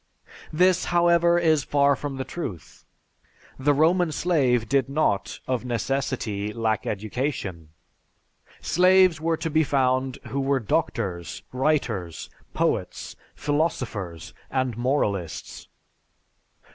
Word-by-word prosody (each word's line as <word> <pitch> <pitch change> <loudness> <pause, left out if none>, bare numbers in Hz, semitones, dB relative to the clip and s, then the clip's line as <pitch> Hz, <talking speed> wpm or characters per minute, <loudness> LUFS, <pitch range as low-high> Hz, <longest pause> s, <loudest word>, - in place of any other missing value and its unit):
This, 180 +3 +3
however, 170 0 +4
is 160 -4 +3
far 140 -1 +3
from 140 0 -5
the 135 - -2
truth. 120 - -7 0.7
The 145 +2 +3
Roman 165 +4 +3
slave 135 -9 +1
did 135 0 +1
not, 140 -9 0
of 125 -2 -1
necessity, 120 -4 -2
lack 110 -2 -1
education. 105 - -3 0.9
Slaves 185 -2 +4
were 165 0 0
to 165 - -3
be 160 +1 +3
found 130 -2 +1
who 140 - -2
were 135 0 +1
doctors, 105 - -2
writers, 125 - -1 0.2
poets, - - -1 0.2
philosophers, 125 - -2 0.2
and 130 -3 -1
moralists. 105 - -2
135 Hz, 105 wpm, -25 LUFS, 110-155 Hz, 0.9 s, however